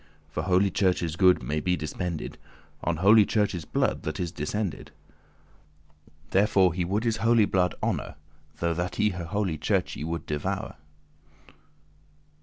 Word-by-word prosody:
For - - -2
holy 95 +1 +2
Church's 90 -4 +1
good 90 -1 +4
may 75 +1 -1
be 90 +3 +1
dispended* 80 +2 -4
*spent - - -31 0.4
On - - 0
holy 105 +2 +8
Church's 100 -6 0
blood - - 0
that - - -4
is 85 -2 -2
descended. 90 +2 -3 1.4
Therefore 95 -2 +4
he 90 +1 -1
would 100 +5 -1
his 115 -2 0
holy 115 -1 +4
blood 90 -2 +1
honour - - -2 0.4
Though 85 0 0
that 85 +2 -3
he 105 - +2
holy 90 -2 -2
Churche - - 0
should 80 +2 -4
devour. 75 -1 -3
90 Hz, 140 wpm, -27 LUFS, 85-100 Hz, 1.4 s, holy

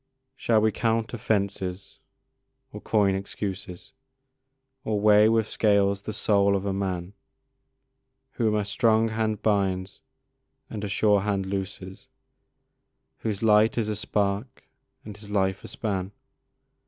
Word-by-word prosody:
Shall 115 -5 +2
we 110 0 +3
count 115 +2 -1
offences 100 -5 -2 0.7
or - - -8
coin 100 -3 +2
excuses, 95 0 -6 0.9
Or 105 -2 -1
weigh 105 +1 +6
with 115 -1 +2
scales 100 -2 +2
the 110 - -5
soul 100 -2 +2
of 100 0 -2
a 100 - -1
man, 95 -1 -3 1.2
Whom 110 -4 0
a 105 -1 0
strong 110 +2 +2
hand 110 -1 -2
binds 95 -1 0 0.7
and 105 -2 -5
a - - -2
sure 105 0 +3
hand 100 -1 -1
looses, 95 -1 -6 1.1
Whose 105 -1 -3
light 110 +1 +4
is 110 -2 0
a 105 - -1
spark 105 +3 -2 0.4
and 105 -1 -8
his 105 0 -12
life 95 -2 0
a - - -8
span? 95 -3 -3
105 Hz, 130 wpm, -26 LUFS, 100-110 Hz, 1.2 s, weigh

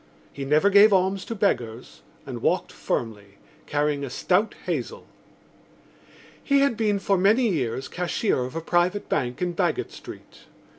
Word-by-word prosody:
He 140 - -6
never 155 +8 +3
gave 205 +2 +7
alms 190 0 +2
to 230 - -5
beggars 120 - -2 0.2
and - - -7
walked - - 0
firmly, 100 -4 -4 0.3
carrying 145 -1 0
a 140 - -4
stout 185 - 0
hazel. - - -4 1.4
He 280 -1 +3
had 280 -4 +2
been 210 -2 +1
for 195 -1 0
many 220 +6 +4
years 130 - -2
cashier 180 - -1
of 130 - -8
a 165 - -2
private 175 +4 0
bank 125 +3 -1
in 175 -1 -1
Baggot 170 -2 -1
Street. - - -12
180 Hz, 150 wpm, -24 LUFS, 135-200 Hz, 1.4 s, gave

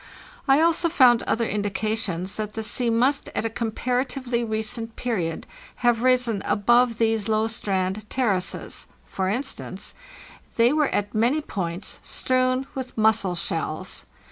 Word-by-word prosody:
I 275 +3 +5
also 335 +1 +3
found 250 -7 +5
other 230 +1 +1
indications 205 -2 -2
that 215 -1 -4
the 220 - -4
sea 235 +2 +2
must 255 +5 +2
at - - -1
a 225 - -1
comparatively 245 +2 -1
recent 225 +1 -3
period 180 -10 -2 0.4
have 235 -2 +4
risen 250 -5 +2
above 240 +2 +3
these 225 -2 +1
low 215 0 +2
strand 200 -1 -2
terraces. 200 -8 -1 0.2
For 190 -1 -2
instance, 245 +8 -3 0.6
they 235 +3 +4
were 300 -2 +3
at 205 0 -1
many 235 +7 +2
points 180 - -4
strewn 255 0 +1
with 260 -3 -6
mussel 215 -4 +2
shells. 165 +1 -3
225 Hz, 135 wpm, -24 LUFS, 205-250 Hz, 0.6 s, I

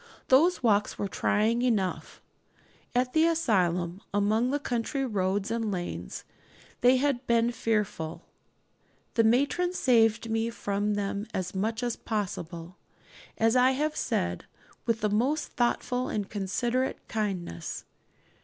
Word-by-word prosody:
Those 315 +5 +4
walks 210 -3 +2
were 200 - -2
trying 220 +4 +1
enough; 215 -7 -1 0.7
at 250 0 +1
the 320 +1 +5
asylum, 185 - +1
among 215 +4 +2
the 285 - +1
country 270 +1 -2
roads 195 -3 -1
and 225 -2 -1
lanes, 175 -2 -5 0.6
they 250 +1 +5
had 265 -2 0
been 235 0 +3
fearful. 210 -9 -2 0.9
The 230 - +4
matron 285 +10 +2
saved 230 -7 +3
me 225 +1 0
from 205 -2 -1
them 200 +1 -2
as 185 -1 -2
much 220 +5 -1
as 240 -2 -1
possible, 180 -5 -4 0.6
as 225 +2 +3
I 255 +1 +5
have 305 +1 0
said, - - -1 0.4
with 230 -1 +1
the 210 - +2
most 265 +9 +1
thoughtful 250 0 0
and 205 -2 -2
considerate 235 +6 -2
kindness. 185 - -3
225 Hz, 125 wpm, -28 LUFS, 200-250 Hz, 0.9 s, the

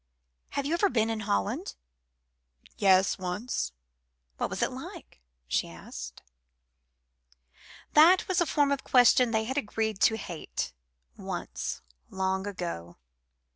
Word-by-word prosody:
"Have 280 - 0
you 300 - 0
ever 390 +4 +3
been 225 -5 +1
in 225 - -2
Holland?" 100 -1 -1 1.0
"Yes, 190 -1 +4
once." 180 - -2 0.7
"What - - -1
was - - -2
it - - +1
like?" - - -10 0.3
she 65 - 0
asked. 65 -6 -9 1.7
That 335 +5 +7
was 370 -2 +2
a 345 - +2
form 290 -1 +2
of 280 - 0
question 250 0 +5
they 220 -1 +1
had 265 +5 -1
agreed 220 -3 -2
to 220 +1 +4
hate 170 - -5 0.4
once, 60 +1 -5 0.3
long 190 +1 -1
ago. 170 - -5
210 Hz, 125 wpm, -29 LUFS, 175-260 Hz, 1.7 s, That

